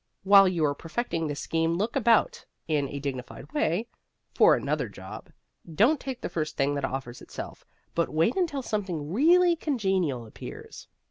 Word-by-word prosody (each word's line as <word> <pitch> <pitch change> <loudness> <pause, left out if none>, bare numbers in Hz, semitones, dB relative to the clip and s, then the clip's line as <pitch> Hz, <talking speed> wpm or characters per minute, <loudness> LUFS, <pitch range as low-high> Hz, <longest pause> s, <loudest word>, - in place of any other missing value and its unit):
While 195 0 +7
you 170 -4 +1
are 145 - +1
perfecting 165 +1 -3
this 145 -1 -4
scheme 165 0 0
look 210 +6 -2
about, 275 - +2 0.2
in 145 -3 0
a 145 - -5
dignified 135 - -6
way, 225 - 0 0.5
for - - +6
another - - -2
job. - - -10 0.4
Don't 240 - +3
take 260 -2 -6
the - - -2
first 155 -2 -4
thing 140 0 +1
that 140 -1 -3
offers 130 -2 -5
itself, - - -9 0.3
but 170 - 0
wait 160 +10 +1
until 325 -8 -1
something 180 -9 -3
really 345 - +5
congenial 190 - -1
appears. 110 - -10
175 Hz, 160 wpm, -27 LUFS, 145-240 Hz, 0.5 s, While